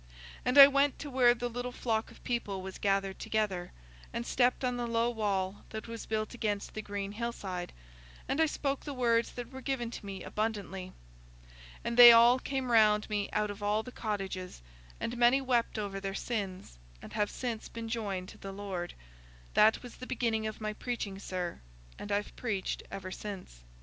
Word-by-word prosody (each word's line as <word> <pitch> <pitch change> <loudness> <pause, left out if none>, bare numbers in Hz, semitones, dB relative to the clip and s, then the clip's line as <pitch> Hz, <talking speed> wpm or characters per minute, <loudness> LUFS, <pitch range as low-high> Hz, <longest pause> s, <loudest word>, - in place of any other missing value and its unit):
And 250 +3 +1
I 280 - +14
went 280 0 +2
to 290 - -7
where 245 -2 +5
the 245 0 -2
little 245 +1 -4
flock 225 -3 -1
of - - -17
people 210 -6 -2
was 190 0 -7
gathered 195 -1 0
together, 200 -5 -1 0.4
and 120 - -3
stepped 250 +1 +2
on 250 0 0
the 240 -1 -2
low 230 +1 +1
wall 200 -3 -1
that 220 +1 -6
was 230 0 -7
built 215 0 -2
against 210 -4 -2
the 215 - -4
green 200 -1 -4
hillside, 205 -5 -4 0.6
and 300 - +1
I 320 - +5
spoke 280 -2 -2
the 285 - -5
words 235 -2 +2
that 245 +1 -7
were 265 0 -8
given 255 -4 -2
to - - -7
me 195 -2 -6
abundantly. 200 -4 -3 0.9
And 235 - -2
they 240 -1 +13
all 235 +2 +7
came 265 -2 -2
round 215 -2 +4
me 205 -1 0
out 210 -1 0
of 205 +1 -9
all 210 +1 +1
the 250 - -9
cottages, 195 - -4 0.4
and 235 - -3
many 240 +3 +5
wept 245 -4 +1
over 200 -2 -3
their 195 0 -4
sins, 190 - -4 0.2
and - - -11
have 210 -1 +1
since 235 -4 -4
been 230 -1 -6
joined 200 -5 -3
to - - -13
the 195 - -7
Lord. 195 -3 -5 0.6
That 215 +3 +5
was 245 - -10
the 255 - -8
beginning 225 -4 0
of 215 - -6
my 215 -1 -3
preaching, 210 -4 -4
sir, 180 -3 -4 0.4
and 205 - -6
I've 205 +1 -1
preached 205 -6 -2
ever 185 -1 -6
since." 190 - -7
220 Hz, 190 wpm, -31 LUFS, 195-240 Hz, 0.9 s, I